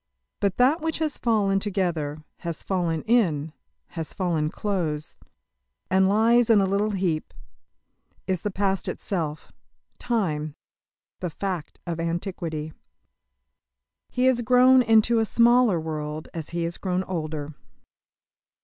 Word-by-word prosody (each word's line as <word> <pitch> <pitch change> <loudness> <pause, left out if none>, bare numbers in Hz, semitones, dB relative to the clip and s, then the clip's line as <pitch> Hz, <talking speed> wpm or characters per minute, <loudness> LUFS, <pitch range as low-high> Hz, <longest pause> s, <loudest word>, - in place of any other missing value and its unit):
But 200 -2 0
that 270 +6 +4
which 320 0 -1
has 310 -2 -2
fallen 205 -4 +2
together, 170 -7 -2
has 170 -3 -5
fallen 170 -4 -1
in, 160 -10 +1 0.4
has 165 -3 -6
fallen 165 -5 0
close, 160 -7 -3 0.7
and 190 0 +4
lies 230 +3 +4
in 220 -2 +6
a 195 - +3
little 200 +2 +1
heap, 180 -6 -1 0.9
is 185 -2 -1
the 210 - -1
past 195 0 -1
itself 160 -6 -4 0.5
time 155 -11 -1 0.6
the 180 - -3
fact 180 -1 -5
of 170 -2 -4
antiquity. 165 -2 -3 1.4
He 250 +1 0
has 255 -2 +3
grown 255 +2 +6
into 225 0 +4
a - - +3
smaller 235 -4 +4
world 155 -1 -5
as 165 -3 -6
he 170 0 -2
has 170 0 -4
grown 185 -1 -1
older. 155 -4 -4
185 Hz, 125 wpm, -25 LUFS, 160-220 Hz, 1.4 s, in